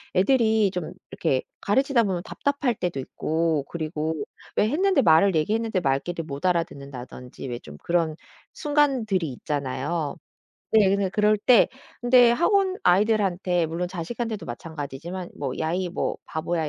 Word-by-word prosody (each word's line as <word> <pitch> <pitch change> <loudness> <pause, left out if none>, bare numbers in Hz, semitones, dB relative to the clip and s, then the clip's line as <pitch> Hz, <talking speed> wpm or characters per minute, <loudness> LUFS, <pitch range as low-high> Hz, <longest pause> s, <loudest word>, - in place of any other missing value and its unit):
애들이 220 +1 +3
좀 180 -3 -4 0.2
이렇게 130 -1 0 0.2
가르치다 265 +4 +2
보면 185 -4 -1
답답할 280 0 -1
때도 175 -7 -3
있고 160 +2 -1
그리고 160 -1 -3 0.4
왜 210 - +3
했는데 375 +7 +3
말을 170 +3 +5
얘기했는데 215 +5 +1
말귀를 155 +4 -1
못 140 +3 -6
알아듣는다든지 140 -7 -4
왜 120 - -3
좀 75 -1 -12
그런 165 -3 +1 0.4
순간들이 255 - +1
있잖아요. 145 +3 -3 0.6
네. 205 -3 +5
그래서 200 -1 +1
그럴 210 0 +3
때 240 +3 +5 0.3
근데 245 0 +6
학원 380 - +2
아이들한테 185 -3 +2
물론 165 +3 -3
자식한테도 210 +5 -4
마찬가지지만 160 +6 -6
뭐 135 -3 -2
"야이 175 +3 -1
뭐 175 - -2
바보야. 160 0 -2
180 Hz, 335 characters per minute, -25 LUFS, 155-220 Hz, 0.6 s, 근데